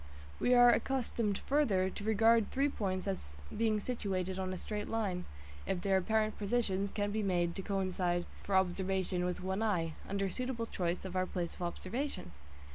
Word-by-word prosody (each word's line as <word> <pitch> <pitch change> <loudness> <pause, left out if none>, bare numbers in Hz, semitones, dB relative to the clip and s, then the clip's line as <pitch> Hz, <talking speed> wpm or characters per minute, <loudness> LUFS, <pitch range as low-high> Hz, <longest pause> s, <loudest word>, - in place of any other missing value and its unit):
We 250 - +4
are 245 0 +8
accustomed 235 -7 0
further 225 -10 +3
to - - -7
regard 225 +1 +4
three 280 +2 +2
points 185 -7 -2
as 130 - -4 0.2
being 220 -1 +2
situated 190 -5 -2
on 185 0 -2
a 185 - -3
straight 210 +2 -4
line, 200 -6 -1 0.4
if 180 - -1
their 195 0 +3
apparent 215 +3 +1
positions 200 -2 0
can 205 0 -1
be 215 +1 0
made 175 -4 +1
to - - -2
coincide 185 -3 0 0.2
for 200 - -1
observation 190 -1 +1
with 180 0 -2
one 190 +2 -1
eye, 175 -7 +1 0.2
under 195 0 0
suitable 240 +4 -2
choice 180 -4 -2
of 190 -1 -5
our 185 0 +1
place 175 -2 -3
of - - -11
observation. 185 - -3
195 Hz, 175 wpm, -34 LUFS, 185-220 Hz, 0.4 s, are